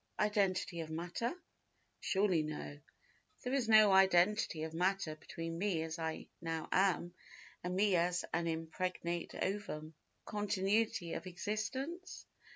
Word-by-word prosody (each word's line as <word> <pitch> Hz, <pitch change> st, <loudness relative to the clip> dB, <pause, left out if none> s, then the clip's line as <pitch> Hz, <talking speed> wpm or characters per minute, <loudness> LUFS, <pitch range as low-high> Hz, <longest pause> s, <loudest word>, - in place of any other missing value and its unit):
Identity 195 Hz, -4 st, +1 dB
of 160 Hz, -1 st, -4 dB
matter? 175 Hz, +9 st, -2 dB, 0.7 s
Surely 190 Hz, -4 st, +2 dB
no. 150 Hz, -1 st, -5 dB, 0.6 s
There 250 Hz, -, -2 dB
is 255 Hz, -5 st, +1 dB
no 215 Hz, -2 st, +8 dB
identity 190 Hz, -2 st, +4 dB
of 160 Hz, 0 st, -4 dB
matter 180 Hz, -2 st, 0 dB
between 165 Hz, +1 st, -6 dB
me 185 Hz, -5 st, +1 dB
as 160 Hz, +1 st, -5 dB
I 160 Hz, -1 st, -3 dB, 0.2 s
now 165 Hz, -1 st, -3 dB
am, 185 Hz, -2 st, +2 dB, 0.5 s
and 180 Hz, +1 st, -2 dB
me 200 Hz, 0 st, +4 dB
as 175 Hz, +1 st, +1 dB
an 170 Hz, 0 st, +1 dB
impregnate 170 Hz, +1 st, -3 dB
ovum. 175 Hz, -6 st, -3 dB, 0.3 s
Continuity 205 Hz, -3 st, 0 dB
of -, -, -5 dB
existence? 260 Hz, -, -4 dB
180 Hz, 125 wpm, -35 LUFS, 165-205 Hz, 0.7 s, no